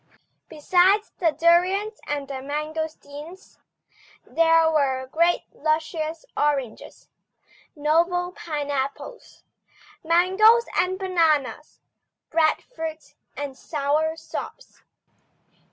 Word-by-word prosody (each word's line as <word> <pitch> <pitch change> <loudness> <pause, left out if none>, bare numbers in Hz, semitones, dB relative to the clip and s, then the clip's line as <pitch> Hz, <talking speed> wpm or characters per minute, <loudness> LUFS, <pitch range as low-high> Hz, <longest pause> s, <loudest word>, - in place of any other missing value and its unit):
Besides 365 +7 +2
the 340 - +3
durions 370 +7 +2
and 290 -1 -3
the 265 -1 -6
mangosteens, 305 +3 -6 0.7
there 330 0 +4
were 270 -4 +1
great 335 +6 +1
luscious 315 +1 -2
oranges, 275 -6 -2 0.7
noble 340 +4 +1
pineapples, 290 - -5 0.6
mangoes 380 +8 +4
and 370 +1 +1
bananas, 325 -6 0 0.5
breadfruit 320 0 -1 0.2
and 285 -2 -5
sour 305 +3 -1
sops. 325 - -9
320 Hz, 75 wpm, -24 LUFS, 295-355 Hz, 0.7 s, there